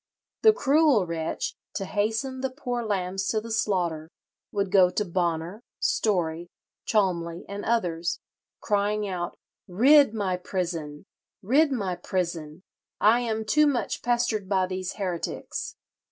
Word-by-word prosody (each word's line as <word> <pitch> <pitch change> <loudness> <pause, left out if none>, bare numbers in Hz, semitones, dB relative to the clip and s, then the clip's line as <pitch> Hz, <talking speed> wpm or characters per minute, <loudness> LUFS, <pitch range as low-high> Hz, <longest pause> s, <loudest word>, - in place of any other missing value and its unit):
The 440 - +8
cruel 290 - +3
wretch, 165 -1 -3 0.2
to 195 - -2
hasten 225 +7 -1
the 265 - 0
poor 245 -3 -4
lambs 195 -2 -2
to 220 - +1
the 230 +1 -8
slaughter, 175 -8 0 0.4
would 200 -2 -1
go 190 -3 +6
to 210 +3 -1
Bonner, 175 +2 -2 0.2
Story, 175 -5 0 0.4
Cholmley, 175 -5 0
and 200 +1 -6
others, 175 -7 0 0.4
crying 205 0 0
out, 175 -2 -4 0.3
'Rid 270 +9 +6
my 190 -4 0
prison! 170 -4 -4 0.4
rid 280 +9 +4
my 200 -8 -1
prison! 170 -3 -3 0.4
I 220 +3 +5
am 220 -2 -2
too 300 +7 +4
much 265 -4 -1
pestered 235 -5 0
by 190 -2 +2
these 185 0 -4
heretics.'" 180 -4 -4
195 Hz, 130 wpm, -26 LUFS, 175-230 Hz, 0.4 s, The